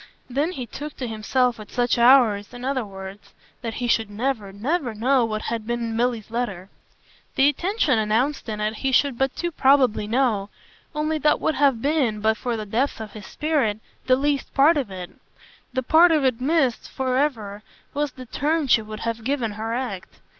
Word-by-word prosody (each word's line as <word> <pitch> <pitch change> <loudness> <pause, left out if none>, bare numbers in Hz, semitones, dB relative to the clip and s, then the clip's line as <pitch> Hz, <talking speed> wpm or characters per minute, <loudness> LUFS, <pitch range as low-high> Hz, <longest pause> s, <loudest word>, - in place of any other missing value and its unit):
Then 285 +8 -1
he 255 -6 -5
took 290 +6 -8
to 255 - -4
himself 235 +2 0
at 210 - -10
such 245 -1 0
hours, 235 -4 +5
in 245 +1 -7
other 265 -2 0
words, 195 0 -10 0.3
that 230 -1 -4
he 245 - -2
should 225 -2 +1
never, 215 -1 -2
never 245 - -2
know 250 +3 +2
what 215 -1 -3
had 225 -1 -4
been 240 0 -1
in 230 -1 -3
Milly's 230 -2 -1
letter. 205 -6 -3 0.6
The 275 +1 +5
intention 315 - +1
announced 230 +5 0
in 210 -1 -4
it 215 +1 -1
he 270 +3 -1
should 275 +1 +3
but 270 +2 0
too 345 0 -2
probably 265 -7 +3
know; 220 -4 +1 0.5
only 305 +1 -1
that 300 +1 +3
would 315 - 0
have 270 -6 +2
been, 275 -8 +1
but 220 +1 +2
for 240 0 -3
the 215 - -5
depths 235 +7 -1
of 220 -2 -7
his 205 -3 -10
spirit, 285 -9 0 0.3
the 255 - +5
least 280 +1 -1
part 290 +5 +6
of 270 -7 -1
it. 185 -2 -7 0.6
The 260 0 -2
part 330 +6 +6
of 305 -4 +2
it 255 -2 +1
missed 275 -4 +1
for 255 -1 -1
ever 220 -8 -1 0.3
was 290 -2 -1
the 255 - -10
turn 300 +6 0
she 240 -3 +4
would 215 0 -8
have 230 0 -3
given 250 -3 -1
her 220 +2 -4
act. 235 -7 -5
245 Hz, 195 wpm, -23 LUFS, 220-275 Hz, 0.6 s, part